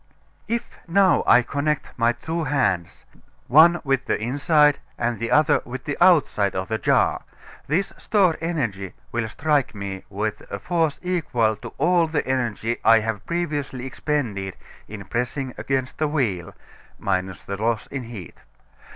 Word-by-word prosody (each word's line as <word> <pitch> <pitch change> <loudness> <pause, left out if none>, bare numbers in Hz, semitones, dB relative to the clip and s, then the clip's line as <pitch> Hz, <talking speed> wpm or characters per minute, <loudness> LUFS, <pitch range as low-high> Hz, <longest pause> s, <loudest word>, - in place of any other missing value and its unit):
If 235 0 -2 0.2
now 190 +2 +4
I 125 - +6
connect 145 +3 -2
my 115 0 +3
two 160 +6 -4
hands, 95 - -1 0.4
one 165 +5 +6
with 135 -2 0
the - - 0
inside 145 +5 +3 0.2
and 120 -1 -1
the 115 0 -2
other 150 0 +4
with 130 +1 -7
the 145 - -3
outside 145 - +3
of 95 0 -3
the 110 0 -1
jar, - - +2 0.5
this 170 +7 0
stored 190 -6 +2
energy 115 - -2 0.2
will 115 -1 -1
strike 145 -3 0
me 100 -2 -5
with 105 +2 -3
a 100 - -4
force 165 - 0
equal 135 -12 0
to - - -10
all 170 +3 +3
the 155 -1 -1
energy 120 -3 -1
I 115 0 +6
have 110 -1 -4
previously 145 -7 -2
expended 120 -9 -3 0.3
in 100 -2 -8
pressing 125 +4 -3
against 130 -1 -2
the 155 - +2
wheel, 110 - -2 0.4
minus 95 0 -2
the 100 - -5
loss 110 +1 0
in 130 -3 -6
heat. 105 -9 -9
130 Hz, 150 wpm, -23 LUFS, 110-155 Hz, 0.5 s, I